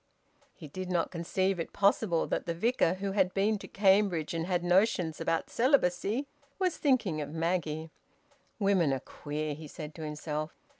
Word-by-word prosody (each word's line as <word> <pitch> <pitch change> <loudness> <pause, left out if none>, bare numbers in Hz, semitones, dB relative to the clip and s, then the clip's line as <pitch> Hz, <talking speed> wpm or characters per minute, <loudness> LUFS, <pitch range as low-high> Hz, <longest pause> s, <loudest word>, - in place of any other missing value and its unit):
He 155 - -10
did 185 +5 -6
not 175 -2 0
conceive 185 +2 -1
it 165 - -4
possible 200 -3 +2
that - - -2
the 170 - -1
Vicar, 185 -2 +2
who 195 +1 -3
had 190 -2 +1
been 205 +2 +2
to - - -9
Cambridge 190 -5 +2
and 165 0 -2
had 180 -2 0
notions 175 -3 +2
about 165 - -1
celibacy, 230 -1 +2 0.3
was 370 -3 +1
thinking 230 - +1
of 145 - -5
Maggie. 160 -1 -2 0.7
"Women 195 -8 +3
are 135 - -1
queer," 150 +3 -5
he 155 +1 -9
said 150 +1 -8
to 160 - -8
himself. 150 0 -4
175 Hz, 165 wpm, -30 LUFS, 160-200 Hz, 0.7 s, Women